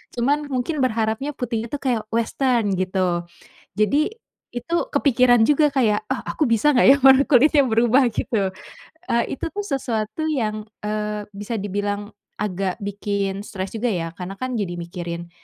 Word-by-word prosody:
Cuman 285 +5 +1
mungkin 270 +4 -2
berharapnya 225 +3 0
putih 235 -3 -3
itu 290 - -4
kayak 235 -5 -1
western 230 -1 +1
gitu. 185 -2 0 0.5
Jadi 285 - +2 0.4
itu 245 +8 -3 0.2
kepikiran 250 - +4
juga 295 0 +4
kayak, 215 -6 +2
ah 265 - -1
aku 315 - +1
bisa 230 +6 +3
gak 245 - +5
ya 280 - +7
warna 270 +1 +8
kulitnya 285 +2 +5
berubah 240 +3 +3
gitu, 210 -2 -1 0.6
eee, 235 0 +3
itu - - -4
tuh 410 0 -4
sesuatu 250 - -2
yang, 215 -6 -1 0.2
eee, 210 0 -3
bisa 210 +3 -4
dibilang 205 +1 -3 0.3
agak 190 -2 -2
bikin 200 -1 -2
stres 190 0 -6
juga 235 +2 0
ya, 165 -3 -2
karena 190 +2 -6
kan 255 0 -3
jadi 190 -4 -2
mikirin 170 0 -6
225 Hz, 150 wpm, -22 LUFS, 205-260 Hz, 0.6 s, warna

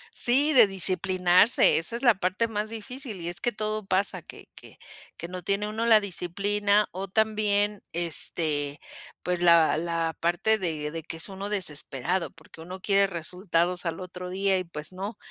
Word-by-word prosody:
Sí, 280 +6 +2
de 235 -5 +7
disciplinarse, 185 +1 +3
esa 165 +8 -3
es 235 - -5
la 240 -4 +6
parte 185 +5 0
más 215 -1 -3
difícil. 225 - -7
Y 170 - -4
es 175 - -6
que 240 - +1
todo 215 -1 -3
pasa, 195 +1 0
que - - -13
que - - -15 0.4
que 170 - -6
no 180 +1 -7
tiene 200 +3 -1
uno 220 +2 -2
la 225 -2 +6
disciplina, 200 +2 0
o 190 +2 -5
también, 210 0 +1
este, 155 -3 -1 0.4
pues, 180 -1 -1
la 170 -3 +5
la 165 0 -2
parte 175 +6 +2
de 155 -6 -3
de 165 -1 -6
que 165 - -7
es 165 - -3
uno 195 +1 -6
desesperado. 170 -2 -2
Porque 160 0 -16
uno 180 +3 -8
quiere 200 +1 +3
resultados 175 0 -2
al 165 +1 -3
otro 180 0 -7
día, 195 +1 +1
y, 185 - -2
pues, 155 0 -6
no. 200 +4 -6
185 Hz, 175 wpm, -26 LUFS, 170-210 Hz, 0.4 s, de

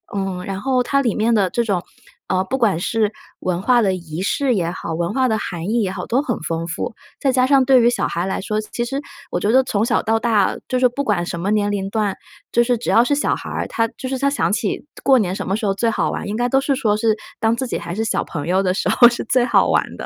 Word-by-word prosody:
嗯， 195 -2 -3
然 195 -1 -4
后 260 0 +1
它 275 +3 +1
里 235 -6 0
面 225 +2 +2
的 195 -4 +2
这 235 - 0
种， 200 -6 0 0.5
呃， 185 0 +1
不 260 +8 -3
管 200 -8 +2
是 215 +3 0 0.3
文 180 -1 -1
化 240 +4 +3
的 195 -4 +1
仪 170 -1 -6
式 260 +6 +1
也 175 -6 0
好、 175 - -5
文 170 +3 -1
化 260 +2 +1
的 220 - +1
含 170 -5 -5
义 230 +3 +1
也 190 -3 -1
好， 190 -2 -5
都 255 +4 +1
很 240 -6 -3
丰 165 +1 -3
富。 170 +6 -4 0.3
再 270 - +2
加 255 0 +3
上 270 -2 +4
对 260 -1 +6
于 235 - +5
小 245 - 0
孩 170 - -2
来 190 - -2
说， 215 +2 -2
其 240 +2 -4
实 275 +3 -3 0.3
我 - - 0
觉 205 - 0
得 260 +2 +5
从 215 -4 0
小 235 0 +1
到 225 +1 +1
大， 220 -5 +2
就 255 - +1
是 250 0 +5
不 265 +4 -3
管 200 -8 0
什 170 -1 -4
么 190 +4 -2
年 205 -1 +1
龄 195 -1 -2
段， 210 -2 -1 0.4
就 235 - +4
是 245 0 +1
只 230 - -2
要 230 - +6
是 285 +4 +1
小 290 - +1
孩 - - -8
儿， - - -3
他 230 0 0
就 260 - -5
是 265 0 -2
他 280 +1 +2
想 280 -7 0
起 210 +5 -2 0.2
过 270 -1 +5
年 190 -5 0
什 - - -4
么 195 - 0
时 220 - -3
候 195 - +2
最 230 +4 0
好 - - 0
玩， - - -4
应 205 - -3
该 245 0 +1
都 270 +2 +2
是 275 0 0
说 220 -5 +1
是 220 0 +2 0.2
当 225 +1 +2
自 260 - -3
己 245 - -3
还 170 - -6
是 220 +2 -1
小 - - 0
朋 145 -4 -5
友 185 +3 +2
的 185 -1 0
时 - - -1
候 240 -1 +7
是 235 - -4
最 245 +2 +2
好 240 - +3
玩 - - 0
的， - - -6
220 Hz, 310 characters per minute, -20 LUFS, 190-245 Hz, 0.5 s, 候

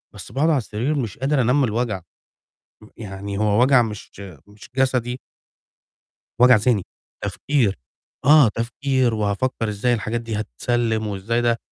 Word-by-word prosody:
بس - - -10
باقعُد 150 +5 +1
على 150 - +3
السرير 120 +5 -2
مش 120 -9 -3
قادر 135 +2 +1
أنام 125 +4 +2
من 130 - +3
الوجع، 110 -3 -2 0.8
م - - -14
يعني 100 -1 -6
هو 105 +1 +2
وجع 130 0 +5
مش 105 -3 -5 0.4
مش 105 +1 -15
جسدي 125 -2 0 1.2
وجع 125 0 +8
ذهني، 110 -1 +1 0.4
تفكير، 105 +3 0 0.5
آه، 145 -3 +7
تفكير 125 +2 0
وهافكّر 110 +3 -1
إزاي 105 +4 0
الحاجات 115 +1 -2
دي 115 -2 -4
هتتسلّم 110 - -1
وإزاي 105 +4 -1
ده 120 -1 +2
115 Hz, 145 wpm, -22 LUFS, 105-130 Hz, 1.2 s, وجع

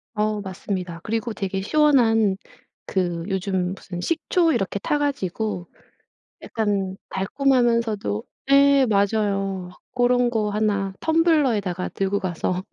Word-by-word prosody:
어 210 0 0
맞습니다. 185 -2 -5
그리고 225 +1 -2
되게 195 -1 -3
시원한 225 -7 +3 0.5
그 175 -3 -1
요즘 190 -1 -1
무슨 175 -2 -8
식초 330 - +1
이렇게 200 -2 -1
타 295 +8 0
가지고 210 -9 -2 0.8
약간 200 -4 -1
달콤하면서도 230 - +1 0.3
예. 280 -1 +6
맞아요. 200 -3 0 0.3
고런 245 0 +3
거 215 -3 0
1 205 -2 0
텀블러에다가 275 - +1
들고 195 +1 0
가서 185 0 -2
205 Hz, 245 characters per minute, -23 LUFS, 190-245 Hz, 0.8 s, 예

